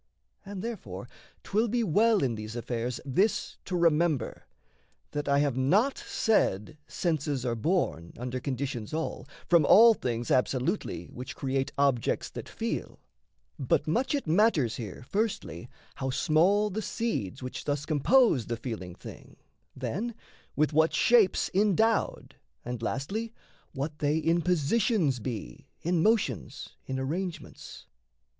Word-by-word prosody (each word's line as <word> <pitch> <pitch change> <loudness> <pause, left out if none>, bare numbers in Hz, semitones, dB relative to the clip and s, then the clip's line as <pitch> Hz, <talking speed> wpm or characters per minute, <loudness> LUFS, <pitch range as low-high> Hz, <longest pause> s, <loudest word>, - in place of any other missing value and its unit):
And, 200 -1 -7
therefore, 230 -2 -6 0.4
'twill 220 +4 +1
be 235 +2 0
well 215 +2 +3
in 125 -3 +1
these 110 +1 -6
affairs 120 0 -3
This 190 - 0
to 180 - -2
remember: 165 -6 +1 0.6
that 145 -1 -3
I 140 - +4
have 145 -4 +1
not 195 - +3
said 150 - 0
Senses 145 -6 -1
are 120 - 0
born, 110 - -1
under 125 +1 -4
conditions 130 -3 -4
all, 160 - -4 0.2
From 170 -3 +5
all 225 +9 +8
things 120 - -3
absolutely 130 - 0
which 125 +1 -8
create 135 0 -1
Objects 140 -4 +1
that - - -8
feel; - - -4 0.6
but 135 - +1
much 245 - +1
it 280 - -2
matters 160 - +2
here 110 0 -7
Firstly, 125 - -2 0.2
how 135 - -3
small 185 +10 +3
the 215 +4 -2
seeds 140 - -3
which 125 - -6
thus 145 0 -1
compose 155 - +3
The 115 - -2
feeling 110 -7 -6
thing, - - -12 0.4
then, 195 - -3 0.4
with 150 +1 +1
what 160 +2 +3
shapes 230 -6 +4
endowed, 215 +3 +1 0.3
And 120 -1 -4
lastly 205 - -3 0.4
what 150 +2 -4
they 150 +1 +1
in 165 +2 +2
positions 180 - +1
be, 110 - -6 0.2
In 175 0 +1
motions, 165 - 0 0.2
in 130 - -2
arrangements. 165 +7 -5
150 Hz, 135 wpm, -28 LUFS, 125-195 Hz, 0.6 s, all